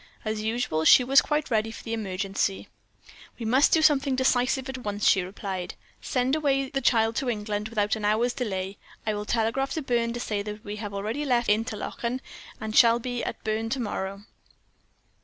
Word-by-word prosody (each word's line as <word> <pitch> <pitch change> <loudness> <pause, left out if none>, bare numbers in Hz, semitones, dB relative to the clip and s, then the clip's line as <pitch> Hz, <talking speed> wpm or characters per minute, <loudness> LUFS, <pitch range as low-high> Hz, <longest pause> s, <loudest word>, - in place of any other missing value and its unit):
"As 215 0 -2
usual, 220 -8 -1
she 250 - +7
was 270 +3 +6
quite 300 -2 -1
ready 220 0 +1
for 225 - -9
the 230 - -4
emergency. 195 -2 -2 0.7
"'We 230 - -6
must 260 +6 +4
do 320 - +4
something 280 -3 +3
decisive 260 0 +1
at 265 -1 -5
once,' 205 -3 -1
she 190 - +5
replied; 185 0 -5 0.3
'send 255 +1 0
away 275 -3 +1
the 270 - -1
child 225 -2 +3
to 260 - 0
England 210 -1 -3
without 210 -2 0
an 220 - -6
hour's 220 +4 +2
delay. 195 -6 -3 0.3
I 215 - 0
will 210 0 -4
telegraph 230 +5 0
to 315 - -3
Berne 235 -2 0
to 240 - -4
say 210 -3 -2
that 210 +1 -7
we 205 +1 -5
have 205 -2 -6
already 215 +9 -2
left 245 -4 +1
Interlachen, 225 +3 -1 0.4
and 220 -2 -5
shall 230 -1 +7
be 245 0 -4
at - - -5
Berne 220 +1 -1
to 265 - -2
morrow.' 200 -3 -4
225 Hz, 190 wpm, -26 LUFS, 210-255 Hz, 0.7 s, she